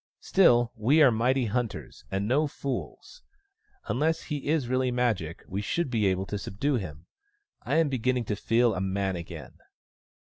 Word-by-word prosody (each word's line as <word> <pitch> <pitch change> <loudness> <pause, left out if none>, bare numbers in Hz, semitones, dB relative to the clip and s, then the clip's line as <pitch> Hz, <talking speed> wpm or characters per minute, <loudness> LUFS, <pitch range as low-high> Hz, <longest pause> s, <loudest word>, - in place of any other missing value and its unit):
" - - -69
Still, 120 -11 +4
we 125 +8 +3
are 135 - +7
mighty 125 +3 +1
hunters, 105 - -4
and 100 +5 -2
no 145 +6 +2
fools: 140 - -6 0.6
unless 160 +5 0
he 145 -4 -5
is 150 -4 +1
really 130 +1 +1
Magic 115 -10 -1
we 95 +2 -3
should 140 +6 -1
be 110 -4 +2
able 95 0 0
to 105 +1 -4
subdue 130 +9 -1
him. 80 -6 -7 0.6
I 140 - -2
am 165 -1 +4
beginning 125 -1 0
to 105 - -2
feel 115 +3 +2
a 95 - -3
man 95 0 -1
again." 85 -1 -9
120 Hz, 170 wpm, -27 LUFS, 100-135 Hz, 0.6 s, are